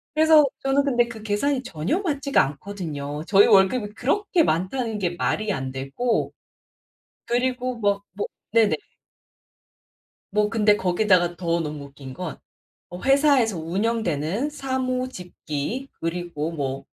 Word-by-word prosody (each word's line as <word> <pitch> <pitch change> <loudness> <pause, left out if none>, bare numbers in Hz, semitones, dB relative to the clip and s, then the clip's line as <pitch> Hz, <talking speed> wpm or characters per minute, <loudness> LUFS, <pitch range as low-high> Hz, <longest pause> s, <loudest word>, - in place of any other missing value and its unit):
그래서 310 -1 +6 0.2
저는 270 +1 +2
근데 240 -4 +2
그 220 -2 -9
계산이 255 +6 0
전혀 185 - -2
맞지가 285 -6 +2
않거든요. 150 -2 -5
저희 200 0 +6
월급이 205 +2 +4
그렇게 340 - +1
많다는 220 - -1
게 180 -3 0
말이 215 +4 -1
안 130 -4 -4
되고 135 - -1 1.0
그리고 250 +1 -1
뭐 200 -2 +1
뭐 205 - -2 0.3
네네. 225 -3 +4 1.6
뭐 210 0 +2
근데 210 -2 +3
거기다가 180 -2 +2
더 170 -1 -1
너무 150 -3 -5
웃긴 140 -1 -11
건 180 +2 -6 0.6
어 180 - -7
회사에서 270 - +3
운영되는 190 - -1
사무 260 -3 -2
집기 180 - -5
그리고 165 -2 -3
뭐 135 -4 -3
205 Hz, 260 characters per minute, -24 LUFS, 170-255 Hz, 1.6 s, 그래서